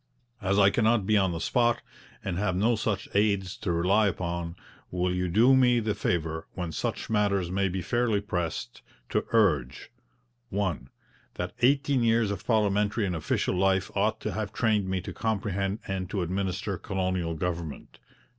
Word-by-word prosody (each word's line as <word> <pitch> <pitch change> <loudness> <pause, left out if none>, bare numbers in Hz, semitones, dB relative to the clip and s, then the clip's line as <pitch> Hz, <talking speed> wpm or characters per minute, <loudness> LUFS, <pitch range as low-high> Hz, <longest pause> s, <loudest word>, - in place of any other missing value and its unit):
As 100 +1 +1
I 100 -1 +6
cannot 110 -2 +2
be 110 +1 +3
on 95 -3 +3
the 85 - -3
spot, 120 +6 +1 0.4
and 90 -2 -2
have 95 -3 0
no 110 +6 +3
such 105 -2 -2
aids 100 -2 +1
to 90 - -2
rely 95 +6 +3
upon, 85 -2 -3 0.3
will 90 0 0
you 90 0 -1
do 115 +9 +5
me 125 -2 +4
the 110 -2 -1
favour, 80 -3 -2
when 90 -3 -3
such - - -3
matters 100 -4 +1
may 95 +1 +1
be 90 0 -3
fairly 120 -4 +1
pressed, 90 - -4 0.3
to - - -1
urge: 75 - +1 0.6
'1. 95 -10 -2 0.5
That 90 0 -4
eighteen 135 +1 +3
years 115 -2 +3
of 100 +2 -6
parliamentary 105 -1 +2
and 90 -3 -2
official 80 - -1
life 95 0 +1
ought 110 +2 +1
to 105 - -2
have 105 +1 -3
trained 105 -4 +1
me 95 -1 -1
to - - -7
comprehend 100 -2 -1
and 95 -2 -3
to 100 -2 -1
administer 95 +2 -2
colonial 95 -4 -2
government. 85 -2 -5
100 Hz, 165 wpm, -28 LUFS, 90-110 Hz, 0.6 s, I